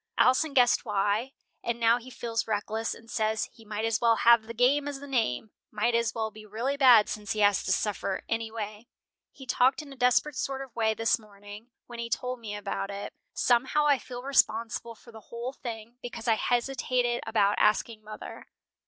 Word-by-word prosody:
Alson 275 +4 +3
guessed 245 -2 +4
why, 210 +4 0 0.3
and 235 0 -2
now 230 +1 +4
he 250 +2 -12
feels 230 -2 -3
reckless, 220 +1 -2
and 225 - -16
says 220 -1 0
he 225 - -17
might 215 0 -3
as 225 -2 0
well 230 -1 +5
have 235 -1 +5
the 230 - -6
game 275 +5 +3
as 285 -1 -4
the 285 - -9
name, 225 - -1 0.2
might 215 +3 0
as 230 -1 +1
well 220 -1 -2
be 215 +1 -12
really 230 +7 -2
bad 250 -6 +7
since 210 -1 -4
he 215 - -2
has 205 -1 +4
to - - 0
suffer 200 -1 -1
anyway. 225 -1 -4 0.4
He 270 - -12
talked 260 +4 +2
in 280 -2 -11
a - - -12
desperate 255 +3 +2
sort 270 0 -2
of 260 -4 -14
way 220 -1 +1
this 225 +1 +2
morning 205 +1 -13 0.2
when 240 -1 -10
he 235 0 -4
told 250 +1 -2
me 215 -3 -6
about 200 -1 -4
it. 200 0 -6 0.2
Somehow 260 +5 +2
I 285 -3 +4
feel 245 -1 -8
responsible 230 -3 +1
for 235 - -16
the 220 -1 -12
whole 235 +3 -5
thing, 235 -2 -8
because 240 -1 -7
I 225 - +5
hesitated 245 +1 0
about 210 -2 +2
asking 215 +1 +1
mother." 215 0 -9
230 Hz, 195 wpm, -28 LUFS, 215-250 Hz, 0.4 s, bad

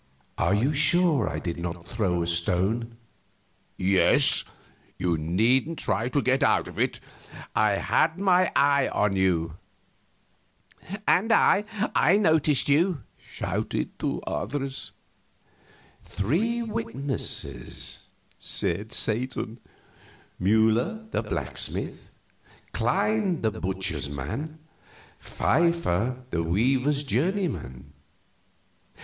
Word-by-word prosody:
"Are 85 +4 +2
you 130 +8 +1
sure 155 - +3
I - - -4
did 85 -1 -4
not 85 0 -5
throw 90 -6 -1
a - - -2
stone?" 95 +8 0 0.8
"Yes. 95 0 +4 0.5
You 90 -2 0
needn't 115 - +1
try 115 +2 -1
to 140 +2 0
get 130 +1 +2
out - - +3
of - - -9
it; - - 0 0.6
I 105 -1 +3
had 160 - +1
my 185 -2 +3
eye 140 -1 +4
on 100 -2 0
you." 85 -4 +1 1.5
"And 220 +6 +3
I 205 -2 +4 0.3
I 175 +8 +4
noticed 160 -8 +3
you!" 155 - +2 0.2
shouted - - -4
two - - -2
others. 135 -1 -4 1.1
"Three 215 - -1
witnesses," 115 - -5 0.3
said 100 +6 -2
Satan: 120 0 -2 0.8
"Mueller, 110 - +2
the - - 0
blacksmith; - - -4 0.6
Klein, 210 -6 +1
the 110 - +1
butcher's 95 -8 -3
man; 105 - -5 0.6
Pfeiffer, 130 - 0
the 85 - 0
weaver's 130 - +1
journeyman. 140 - -2
120 Hz, 95 wpm, -26 LUFS, 95-155 Hz, 1.5 s, Yes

